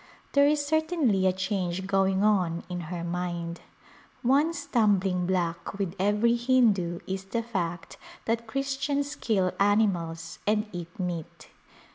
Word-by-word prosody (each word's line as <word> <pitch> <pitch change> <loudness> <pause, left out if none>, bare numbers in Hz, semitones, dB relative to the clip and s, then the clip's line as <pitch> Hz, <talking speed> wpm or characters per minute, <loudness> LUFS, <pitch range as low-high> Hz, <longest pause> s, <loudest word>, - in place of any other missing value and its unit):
There 280 0 +6
is 295 -1 +2
certainly 310 - +2
a - - +4
change 190 -1 -2
going 195 0 +2
on 180 -6 +2
in 180 -1 -4
her 175 -2 -4
mind. 170 -1 -3 0.6
One 280 +6 +4
stumbling 205 - +1
block 175 0 -1
with 195 -4 -2
every 210 +4 +3
Hindu 225 -9 +2
is 190 0 -4
the 230 +4 -2
fact 175 -7 -4 0.3
that 230 0 -1
Christians 275 +3 -1
kill 190 -5 0
animals 180 -6 +1
and 210 0 +2
eat 175 +1 -7
meat. 175 -3 -5
195 Hz, 130 wpm, -27 LUFS, 180-235 Hz, 0.6 s, There